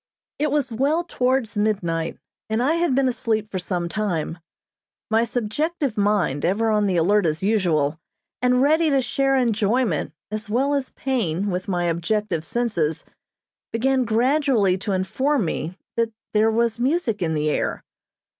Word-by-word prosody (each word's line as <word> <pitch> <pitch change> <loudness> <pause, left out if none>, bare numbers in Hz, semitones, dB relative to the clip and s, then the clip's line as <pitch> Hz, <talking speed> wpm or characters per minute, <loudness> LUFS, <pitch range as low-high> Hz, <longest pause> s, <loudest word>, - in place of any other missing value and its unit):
It 300 +1 +1
was 280 -3 0
well 285 +9 +1
towards 255 -7 0
midnight, 185 -6 -1 0.3
and 220 +2 +1
I 290 +5 +3
had 335 -6 +1
been 270 0 +3
asleep 220 -4 -1
for 185 - -2
some 175 -1 -2
time. 170 -5 -2 0.7
My 225 +1 +4
subjective 255 +4 -2
mind, 200 -9 +1
ever 220 +5 +1
on 210 -1 +2
the 185 -2 +1
alert 195 +3 +3
as 155 +3 -2
usual, 165 -8 +1 0.4
and 250 +1 +3
ready 315 +3 +3
to 275 -2 +3
share 270 +2 +1
enjoyment 225 - +1 0.2
as 215 0 -5
well 265 +6 +1
as 275 -2 -1
pain 205 -8 -1
with 180 +1 -3
my 175 -3 0
objective 170 +1 -1
senses, 170 -8 -1 0.7
began 260 +3 +1
gradually 240 -3 +2
to 200 +2 -3
inform 235 +7 0
me 165 +3 -3 0.2
that 230 -1 +1 0.2
there 215 +1 +4
was 230 0 +1
music 250 - 0
in 160 -2 0
the 150 0 +1
air. - - -2
220 Hz, 155 wpm, -23 LUFS, 185-260 Hz, 0.7 s, My